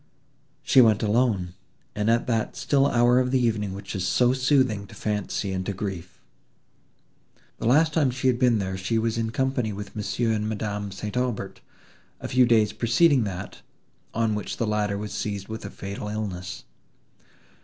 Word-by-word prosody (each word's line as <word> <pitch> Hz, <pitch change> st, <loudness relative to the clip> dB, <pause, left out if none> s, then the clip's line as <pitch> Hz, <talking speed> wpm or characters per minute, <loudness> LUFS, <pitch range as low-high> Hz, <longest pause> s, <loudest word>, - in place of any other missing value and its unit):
She 130 Hz, -, +6 dB
went 110 Hz, -3 st, +4 dB
alone, 105 Hz, -5 st, +1 dB, 0.4 s
and 105 Hz, +1 st, -1 dB
at 115 Hz, +1 st, +2 dB
that 115 Hz, -3 st, -1 dB
still 135 Hz, +2 st, +2 dB
hour 120 Hz, -1 st, +4 dB
of 125 Hz, 0 st, +1 dB
the 130 Hz, 0 st, +2 dB
evening 110 Hz, -5 st, 0 dB
which 100 Hz, 0 st, -7 dB
is 95 Hz, -1 st, -1 dB
so 125 Hz, 0 st, +3 dB
soothing 130 Hz, -6 st, +1 dB
to 110 Hz, -, -14 dB
fancy 105 Hz, -1 st, -2 dB
and 95 Hz, -1 st, -2 dB
to 100 Hz, -, -1 dB
grief. 95 Hz, -2 st, -6 dB, 1.4 s
The -, -, -1 dB
last 155 Hz, +5 st, +4 dB
time 150 Hz, -4 st, +3 dB
she 125 Hz, +1 st, -5 dB
had 125 Hz, -2 st, +3 dB
been 120 Hz, -4 st, +3 dB
here 95 Hz, -1 st, -3 dB
she 95 Hz, +5 st, -1 dB
was 115 Hz, 0 st, 0 dB
in 115 Hz, -1 st, -1 dB
company 125 Hz, -2 st, -1 dB
with 100 Hz, 0 st, -8 dB
Monsieur 110 Hz, +2 st, -1 dB
and 105 Hz, -1 st, -1 dB
Madame 105 Hz, -2 st, -3 dB
St. 105 Hz, +3 st, -6 dB
Aubert, 125 Hz, -3 st, -2 dB, 0.6 s
a -, -, -5 dB
few 125 Hz, -1 st, +4 dB
days 110 Hz, -3 st, +3 dB
preceding 120 Hz, +4 st, +3 dB
that, 95 Hz, -2 st, -6 dB, 0.5 s
on 115 Hz, -1 st, 0 dB
which 105 Hz, -2 st, -4 dB
the 115 Hz, -, 0 dB
latter 105 Hz, -1 st, 0 dB
was 105 Hz, 0 st, -5 dB
seized 100 Hz, -2 st, -4 dB
with 110 Hz, 0 st, -6 dB
a -, -, -5 dB
fatal 100 Hz, +1 st, -6 dB
illness. 100 Hz, -4 st, -5 dB
110 Hz, 175 wpm, -25 LUFS, 100-125 Hz, 1.4 s, She